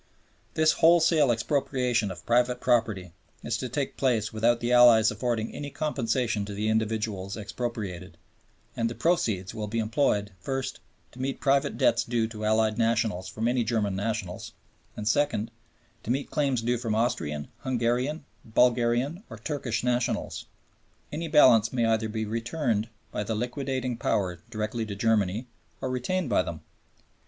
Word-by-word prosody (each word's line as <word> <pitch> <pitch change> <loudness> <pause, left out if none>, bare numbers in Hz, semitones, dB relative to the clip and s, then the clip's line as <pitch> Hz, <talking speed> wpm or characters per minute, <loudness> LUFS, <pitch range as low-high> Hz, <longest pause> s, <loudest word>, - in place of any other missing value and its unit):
This 155 0 +4
wholesale 165 -4 +4
expropriation 125 -2 0
of 90 -3 -9
private 125 +1 +2
property 110 -8 +1 0.3
is 115 - -1
to 130 +1 -4
take 135 +2 -3
place 115 -6 +1
without 115 +2 +2
the 120 +1 0
Allies 120 -2 +7
affording 120 -3 -2
any 145 - -5
compensation 125 -7 -1
to 100 0 -6
the 105 +2 -1
individuals 110 -3 -1
expropriated, 105 -4 -5 0.6
and 115 0 0
the 115 - -6
proceeds 110 - 0
will 110 -2 -4
be 110 +3 -3
employed, 110 -2 +1
first, 135 +6 -3 0.3
to 125 - -9
meet 135 0 -2
private 140 +1 +1
debts - - +3
due 115 -2 0
to 110 -2 -7
Allied 110 +1 +2
nationals 115 -5 +1
from 110 +4 -2
any 120 0 +2
German 110 -4 0
nationals, 100 -3 -3 0.4
and 105 - -4
second, 115 -3 +1 0.5
to - - -9
meet 135 +3 -1
claims 135 -6 0
due 120 0 0
from 115 -3 -1
Austrian, 110 - -1
Hungarian, 130 +4 -1 0.2
Bulgarian, 125 - +2
or 115 - -8
Turkish 120 -1 -3
nationals. 125 0 -1 0.6
Any 165 +2 -3
balance 125 -8 +6
may 120 -3 +1
either 110 -1 +1
be 110 0 -2
returned 115 0 -1 0.2
by 105 - -2
the 110 +1 -2
liquidating 130 +1 -2
Power 90 -6 -1
direct 110 -2 -3
to 110 -4 -3
Germany, 105 +1 +1 0.3
or 130 - -3
retained 155 +7 -1
by 120 - +3
them. 85 -3 -6
115 Hz, 150 wpm, -27 LUFS, 110-130 Hz, 0.6 s, Allies